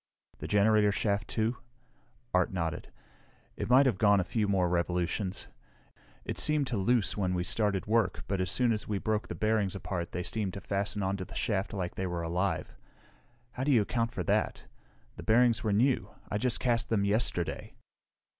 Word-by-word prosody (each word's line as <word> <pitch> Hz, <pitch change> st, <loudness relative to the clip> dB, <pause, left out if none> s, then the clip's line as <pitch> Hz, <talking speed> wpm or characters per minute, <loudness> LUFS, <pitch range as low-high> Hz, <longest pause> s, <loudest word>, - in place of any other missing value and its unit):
"The -, -, -5 dB
generator 105 Hz, 0 st, +4 dB
shaft, 100 Hz, 0 st, -1 dB
too?" 115 Hz, +2 st, -1 dB, 0.8 s
Art 90 Hz, -1 st, +2 dB
nodded. 85 Hz, -4 st, -3 dB, 0.6 s
"It -, -, -4 dB
might 130 Hz, +3 st, +6 dB
have 115 Hz, -8 st, +1 dB
gone 100 Hz, -2 st, +5 dB
a -, -, +2 dB
few 105 Hz, +4 st, -1 dB
more 95 Hz, -3 st, +2 dB
revolutions. 90 Hz, +2 st, -1 dB, 0.8 s
It -, -, -3 dB
seemed 150 Hz, -4 st, +2 dB
loose 110 Hz, +1 st, +1 dB
when 90 Hz, -3 st, 0 dB
we 90 Hz, -, 0 dB
started 100 Hz, +1 st, 0 dB
work, 110 Hz, -3 st, +1 dB
but 100 Hz, -2 st, -1 dB
as 90 Hz, -, -1 dB
soon 125 Hz, +4 st, +2 dB
as 105 Hz, -2 st, -2 dB
we 105 Hz, -, -1 dB
broke 110 Hz, +2 st, -1 dB
the -, -, -5 dB
bearings 110 Hz, -3 st, 0 dB
apart 90 Hz, -3 st, -4 dB
they 90 Hz, -, -3 dB
seemed 105 Hz, -3 st, -3 dB
to -, -, -4 dB
fasten 100 Hz, +1 st, -2 dB
onto 95 Hz, 0 st, -1 dB
the 105 Hz, +4 st, -11 dB
shaft 100 Hz, -2 st, -1 dB
like 95 Hz, -5 st, -3 dB
they 95 Hz, -, -3 dB
were 85 Hz, -1 st, -3 dB
alive. 90 Hz, +2 st, -1 dB, 0.8 s
How 125 Hz, -, -4 dB
do 145 Hz, -, +2 dB
you 115 Hz, -6 st, +5 dB
account 115 Hz, +2 st, -1 dB
for 95 Hz, -, -3 dB
that? -, -, 0 dB, 0.5 s
The -, -, -7 dB
bearings 115 Hz, 0 st, +3 dB
were 110 Hz, -, 0 dB
new; 125 Hz, +6 st, +2 dB, 0.2 s
I 105 Hz, -, 0 dB
just 125 Hz, 0 st, 0 dB
cast 120 Hz, -2 st, +1 dB
them 100 Hz, -3 st, +1 dB
yesterday." 100 Hz, -6 st, -1 dB
100 Hz, 185 wpm, -30 LUFS, 95-115 Hz, 0.8 s, might